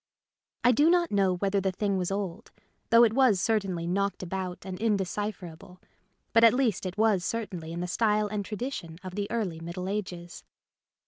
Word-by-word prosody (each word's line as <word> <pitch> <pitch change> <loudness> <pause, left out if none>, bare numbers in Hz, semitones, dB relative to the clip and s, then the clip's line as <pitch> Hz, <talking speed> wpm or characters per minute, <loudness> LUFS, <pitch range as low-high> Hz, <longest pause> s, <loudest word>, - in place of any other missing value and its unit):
I 245 - +6
do 290 +7 +4
not 345 -1 +3
know 195 -3 +2
whether 195 +2 0
the 190 0 0
thing 200 +1 -1
was 180 -2 -1
old, 195 +1 -4 0.4
though 230 +1 +7
it 225 -2 +4
was 250 -6 +4
certainly 195 -6 0
knocked 195 +2 -1
about 185 0 -5
and 185 -1 -6
indecipher 205 -2 -1
able, 180 +3 -15 0.5
but 230 - +5
at 230 +1 +7
least 230 -8 0
it 185 - -7
was 215 -4 +3
certainly 185 -7 -4
in 170 +1 -4
the 180 - -2
style 210 +2 +1
and 205 0 -3
tradition 210 -6 -5
of 185 -1 -7
the 205 +1 -3
early 200 -9 -2
Middle 170 +3 -5
Ages. 180 -4 -5
195 Hz, 185 wpm, -28 LUFS, 180-220 Hz, 0.5 s, though